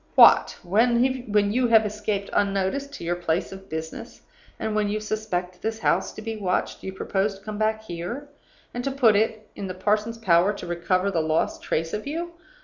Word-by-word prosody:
What! - - +7
when 235 +6 +3 0.5
you 250 +1 +2
have 225 -2 +5
escaped 210 -1 -3
unnoticed 200 +8 0
to 275 - -8
your 175 +1 0
place 175 -1 -1
of 195 0 -11
business, 160 0 -6 0.4
and 220 -1 -2
when 210 -1 +1
you 210 +1 -1
suspect 210 -4 -3
this 220 0 -2
house - - +1
to 215 - -9
be 225 0 -3
watched, 190 -4 -1
you 190 - -5
propose 195 +1 -1
to 195 - -21
come 215 -1 -5
back 220 0 0
here, 200 +10 -5 0.5
and 245 - -3
to 275 - 0
put 255 -6 +4
it 220 0 0
in 200 - -5
the 185 - -5
parson's 210 +4 0
power 185 -2 +3
to 200 - -8
recover 185 +3 0
the 170 -4 +1
lost 155 0 0
trace 165 +1 -2
of 210 +5 -3
you! 335 +4 -3
210 Hz, 195 wpm, -25 LUFS, 185-220 Hz, 0.5 s, What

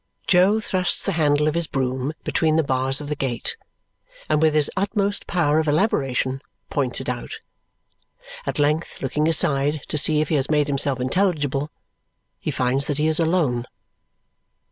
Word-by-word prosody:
Jo 190 +4 +4
thrusts 185 -4 0
the - - -1
handle 150 -3 +2
of 155 - +1
his 170 -1 -1
broom 130 +2 -2
between 160 -1 +1
the 160 - +3
bars 135 +1 +1
of 145 - -7
the 150 - -2
gate, 130 -4 -2 0.7
and 155 0 +1
with 155 -1 +3
his 150 -2 +2
utmost 200 +1 -1
power 155 -4 +2
of 160 - -1
elaboration, 135 - 0 0.3
points 130 -4 0
it - - -6
out. - - -5 1.1
At - - -2
length, 150 +2 0
looking 150 +4 0
aside 145 -1 +2
to 155 - +2
see 150 +1 +2
if 155 - 0
he 160 - +1
has 135 0 +1
made 150 -1 +3
himself 140 -2 0
intelligible, 145 -1 0 0.7
he - - -4
finds 130 +2 0
that 145 - -1
he 150 - +1
is 160 +1 +2
alone. 160 -8 +1
150 Hz, 165 wpm, -22 LUFS, 135-160 Hz, 1.1 s, Jo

